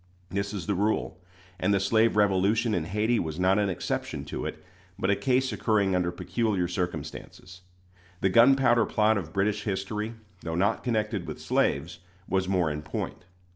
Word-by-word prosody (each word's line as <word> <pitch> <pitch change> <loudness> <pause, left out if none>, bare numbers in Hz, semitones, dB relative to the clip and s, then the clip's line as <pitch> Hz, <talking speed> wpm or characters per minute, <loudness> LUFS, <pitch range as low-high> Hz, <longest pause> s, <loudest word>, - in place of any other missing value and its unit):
This 100 +1 -2
is 100 -4 -5
the 105 - 0
rule; 105 +1 -1 0.4
and 95 - +1
the 100 - +3
slave 110 +4 +3
revolution 105 +2 +2
in 85 -5 0
Hayti 105 +6 +1
was 80 +1 -4
not 95 +2 +3
an 100 -1 +1
exception 90 - -3
to - - -4
it, - - -8 0.3
but 95 0 +1
a - - +3
case 130 +1 +1
occurring 105 -3 +1
under 90 -1 +1
peculiar 100 0 -1
circumstances. 90 +1 -5 0.6
The 95 - +3
gunpowder 120 +2 +5
plot 110 0 +2
of 80 -4 -8
British 105 +3 0
history, 105 +3 -3 0.3
though 80 -1 -4
not 100 +6 +1
connected 105 -6 -1
with - - -6
slaves, - - 0 0.3
was 95 -1 0
more 90 -5 +2
in 75 0 -4
point. 80 +3 -5
100 Hz, 170 wpm, -27 LUFS, 90-110 Hz, 0.6 s, gunpowder